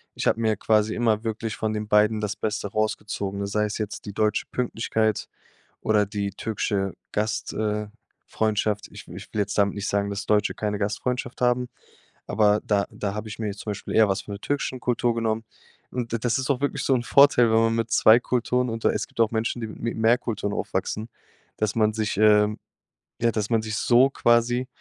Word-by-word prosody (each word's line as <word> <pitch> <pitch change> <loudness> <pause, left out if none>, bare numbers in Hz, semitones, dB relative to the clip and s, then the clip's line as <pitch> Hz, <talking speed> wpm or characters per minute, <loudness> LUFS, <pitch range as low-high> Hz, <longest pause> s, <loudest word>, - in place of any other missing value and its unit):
Ich - - -3
habe 115 - +2
mir 110 -1 +2
quasi 110 +1 +2
immer 110 -2 +1
wirklich 110 -1 -3
von 110 0 -1
den 105 0 -3
beiden 105 +1 +3
das 105 0 -2
Beste 105 -1 -3
rausgezogen, 105 -2 -2
ne, - - -1
sei 105 +1 0
es 105 - -3
jetzt 105 -2 -5
die 100 - -6
deutsche 105 +1 +1
Pünktlichkeit 110 -3 -1 0.5
oder 105 -2 +2
die 100 -1 -3
türkische 100 -3 -2 0.2
Gast 105 0 -2
äh, 105 -1 -1 0.4
Freundschaft. 105 -1 -1
Ich - - -11
w - - -10
ich - - -10
will 105 - 0
jetzt 100 0 -2
damit 100 -1 +2
nicht 100 0 -3
sagen, 100 0 0
dass 100 0 -4
Deutsche 105 0 +2
keine 105 -1 -2
Gastfreundschaft 120 +5 -2
haben, 125 0 +2 0.6
aber 105 -1 +3
da 100 -2 +1
da 100 -1 -3
habe 105 +1 -5
ich 105 - -8
mir 110 -2 -1
zum 105 - -6
Beispiel 100 - -5
eher 110 -2 +6
was 95 +1 -1
von 105 - -7
der 100 - -9
türkischen 140 0 -2
Kultur 120 -1 0
genommen. 115 -1 -1 0.5
Und 120 -2 -4
d 115 - 0
das 120 +1 0
ist 130 +2 -2
auch 135 -2 +1
wirklich 145 - -1
so 135 - +3
'n 125 - +1
Vorteil, 130 -3 +5
wenn 110 - +4
man 115 0 +2
mit 115 0 -1
2 110 +1 +6
Kulturen 125 +1 0
und 115 0 -5
da - - +5
es - - -2
gibt - - -8
auch 115 -2 +4
Menschen, 115 +2 -1
die - - -2
mi 105 - -9
mit 115 - -3
mehr 115 +2 +4
Kulturen 105 -4 -3
aufwachsen, 105 +4 -3 0.5
dass 110 -1 -1
man 110 -1 +2
sich 110 -1 -1
ähm, 105 0 +4 0.6
ja, 115 0 +3
dass 105 -1 -2
man 115 -1 +3
sich 110 0 -4
so 125 +4 +4
quasi, 120 0 +2
110 Hz, 215 wpm, -25 LUFS, 105-115 Hz, 0.6 s, eher